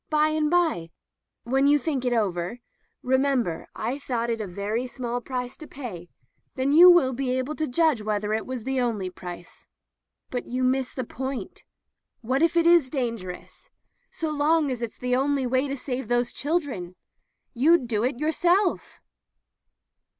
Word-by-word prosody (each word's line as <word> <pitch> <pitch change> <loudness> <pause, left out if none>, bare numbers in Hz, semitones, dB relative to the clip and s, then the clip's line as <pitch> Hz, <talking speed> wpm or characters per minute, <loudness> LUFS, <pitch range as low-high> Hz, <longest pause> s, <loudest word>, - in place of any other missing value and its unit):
By 305 0 +3
and 310 -1 +1
by 325 - +1 0.3
— - - -58
^when 270 +3 +3
you 295 - +6
think 280 -3 -2
it 250 - +1
over 190 -3 -1 0.2
— - - -31
^remember 260 -9 +1
I 245 +6 -3
thought 235 -4 -2
it 225 -1 -2
a 210 - -4
very 205 +7 -3
small 245 -1 -4
price 250 0 -4
to 310 - -10
pay 190 -11 -8 0.2
— - - -47
then 265 +1 0
you 345 +5 +9
will 320 -8 +5
be 260 +1 -2
able 260 +4 -2
to 310 - -1
judge 300 -2 +2
whether 210 0 -1
it 220 - -2
was 255 -3 -5
the 265 +1 -1
only 210 -7 -1
price." 175 -1 -10 0.6
"But 245 - -3
you 255 +1 -2
miss 260 0 +1
the 255 - -4
point. 265 +2 -6 0.6
What, 260 +5 0
if 335 +1 +3
it 335 - +4
is 340 -6 +5
dangerous 230 - -5 0.2
— - - -48
so 320 -1 -3
long 300 0 +2
as 245 -2 -4
it's 235 -2 -5
the 250 0 0
only 275 0 +1
way 260 +3 +1
to 275 0 -3
save 255 0 -4
those 240 0 +1
children? 275 - -2 0.6
You'd 280 +2 +4
do 220 -2 0
it 250 0 0
yourself." 345 +6 +1
255 Hz, 180 wpm, -25 LUFS, 235-290 Hz, 0.6 s, you